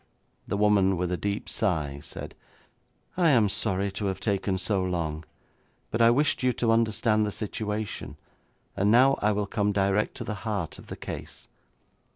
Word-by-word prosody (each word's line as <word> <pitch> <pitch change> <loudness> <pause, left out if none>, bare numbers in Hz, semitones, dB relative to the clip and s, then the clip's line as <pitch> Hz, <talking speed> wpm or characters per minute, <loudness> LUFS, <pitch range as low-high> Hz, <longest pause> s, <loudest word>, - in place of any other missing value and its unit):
The - - -1
woman 100 -2 +3
with 90 0 -1
a - - +1
deep 100 +2 -3
sigh 75 -9 -1
said, - - -8 0.8
'I 175 -3 +4
am 115 -7 +4
sorry 100 -1 0
to 100 +1 -3
have 95 - -2
taken 100 -2 0
so 95 0 0
long, 80 -4 -2 0.7
but 110 - 0
I 115 - +7
wished 145 +6 +2
you 130 0 +3
to 115 -1 +1
understand 110 -1 +2
the 105 - -1
situation, 105 0 -4 0.6
and 100 +1 +2
now 130 +5 +5
I 105 - +3
will 105 0 0
come 105 +1 0
direct 100 +1 +1
to - - -4
the 110 - -4
heart 105 -7 -3
of - - -14
the - - -7
case. - - -8
105 Hz, 175 wpm, -27 LUFS, 95-110 Hz, 0.8 s, I